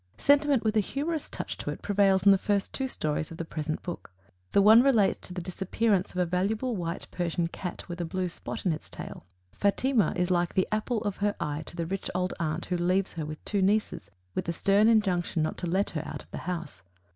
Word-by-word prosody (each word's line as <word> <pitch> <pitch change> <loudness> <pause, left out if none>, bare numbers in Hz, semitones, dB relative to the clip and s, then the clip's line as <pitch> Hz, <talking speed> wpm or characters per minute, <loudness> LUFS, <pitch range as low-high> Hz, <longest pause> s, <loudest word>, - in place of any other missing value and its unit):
Sentiment 285 -3 +4
with 220 -1 +1
a - - +5
humorous 295 - -2
touch - - -5
to - - -4
it - - -6
prevails 195 -2 +3
in 200 - +9
the 195 - +6
first 200 0 0
two 265 - -1
stories 155 -9 -2
of 165 - -9
the 165 - -4
present 155 -1 -4
book. 175 - -6 0.4
The - - +4
one 215 +4 +8
relates 240 -7 +3
to - - -8
the 180 - -4
disappearance 190 +2 0
of - - -10
a 180 - +3
valuable 210 +8 0
white 170 -2 -3
Persian 175 -1 -1
cat 175 +2 -6
with 175 0 -5
a - - -1
blue 185 +2 -2
spot 170 - -6
in 175 - +3
its 155 - -8
tail. 90 - -9 0.2
"Fatima" 215 +3 +2
is 180 0 0
like 175 -1 +1
the 185 - +2
apple 215 +1 0
of 205 -3 -2
her 205 0 0
eye 150 +1 -2
to - - -9
the 170 -1 -2
rich 195 +3 -3
old 180 0 0
aunt 160 +1 -2
who 180 - -1
leaves 185 +3 +1
her 160 -3 -4
with 155 0 -8
two 200 -2 0
nieces, 195 - +1 0.2
with - - -2
a - - 0
stern 200 +4 +4
injunction 185 -7 +2
not 155 - -1
to 175 - -3
let 190 +4 +1
her 155 - -2
out - - -7
of - - -27
the - - -5
house. 170 - -5
185 Hz, 235 wpm, -28 LUFS, 170-210 Hz, 0.4 s, in